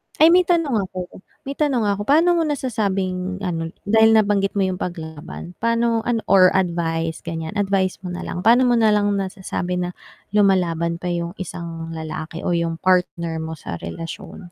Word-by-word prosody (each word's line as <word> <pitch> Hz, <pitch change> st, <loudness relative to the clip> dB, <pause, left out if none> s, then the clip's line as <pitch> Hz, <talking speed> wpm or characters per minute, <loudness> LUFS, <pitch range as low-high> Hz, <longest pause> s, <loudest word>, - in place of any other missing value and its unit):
ay 320 Hz, +2 st, +6 dB
may 360 Hz, 0 st, +5 dB
tanong 285 Hz, -, +1 dB
ako 185 Hz, -1 st, -7 dB, 0.3 s
may 275 Hz, -, -3 dB
tanong 270 Hz, -7 st, +2 dB
ako. 200 Hz, 0 st, -2 dB
Paano 335 Hz, +4 st, +5 dB
mo 340 Hz, -, +2 dB
nasasabing 195 Hz, -9 st, -2 dB
ano 165 Hz, -3 st, -2 dB, 0.2 s
dahil 220 Hz, +1 st, +5 dB
nabanggit 205 Hz, -2 st, +2 dB
mo 200 Hz, -, +2 dB
'yung 185 Hz, -1 st, -2 dB
paglaban 165 Hz, 0 st, -6 dB
paano 230 Hz, 0 st, +2 dB
ano 240 Hz, -2 st, +1 dB
or 185 Hz, -2 st, +7 dB
advice, 165 Hz, -3 st, -1 dB
ganiyan 160 Hz, -1 st, -4 dB
advice 195 Hz, -2 st, 0 dB
mo 185 Hz, -, -6 dB
na 180 Hz, -, -5 dB
lang. 175 Hz, -, -4 dB
Paano 235 Hz, +5 st, +5 dB
mo 245 Hz, -, +3 dB
na 220 Hz, -1 st, +4 dB
lang 205 Hz, 0 st, +2 dB
nasasabi 190 Hz, -2 st, -3 dB
na 180 Hz, 0 st, -2 dB, 0.4 s
lumalaban 175 Hz, -5 st, +2 dB
pa 180 Hz, -, -6 dB
'yung 170 Hz, +1 st, -3 dB
isang 165 Hz, -2 st, -6 dB
lalaki 160 Hz, +1 st, -6 dB
o -, -, +1 dB
'yung 165 Hz, -1 st, -1 dB
partner 170 Hz, -3 st, +1 dB
mo 160 Hz, -, -5 dB
sa 85 Hz, -, -6 dB
relasyon? 165 Hz, -, -8 dB
185 Hz, 175 wpm, -21 LUFS, 170-220 Hz, 0.4 s, or